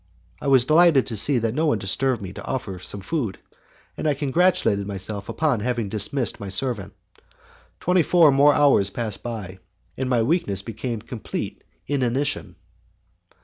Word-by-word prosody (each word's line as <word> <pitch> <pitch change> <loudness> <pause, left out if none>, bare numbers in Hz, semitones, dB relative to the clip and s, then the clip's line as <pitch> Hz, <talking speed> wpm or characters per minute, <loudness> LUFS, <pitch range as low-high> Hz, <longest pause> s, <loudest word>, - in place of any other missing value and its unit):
I - - -4
was 130 -3 +5
delighted 155 -2 +5
to 115 - -4
see 130 +6 +4
that 115 -1 -1
no 155 +4 0
one 130 - +2
disturbed 110 +4 -1
me 95 0 -7
to - - -9
offer 125 -6 -4
me 90 - -7
some 100 +2 -4
food, 115 - -3 0.6
and - - -3
I 145 - +2
congratulated 145 - +1
myself 100 +1 -4
upon 150 -8 0
having 120 -2 -2
dismissed 110 +4 -1
my 100 - -6
servant. 105 0 -2 0.8
Twenty 180 0 +2
four 165 -2 +5
more 140 +2 +5
hours 140 -9 +4
passed 105 -1 -4
by, 105 -6 -6 0.4
and 130 -1 -3
my 120 -3 +2
weakness 110 - 0
became 115 +1 -5
complete 120 -4 -6 0.2
inanition. 135 0 -1
120 Hz, 160 wpm, -23 LUFS, 100-145 Hz, 0.8 s, was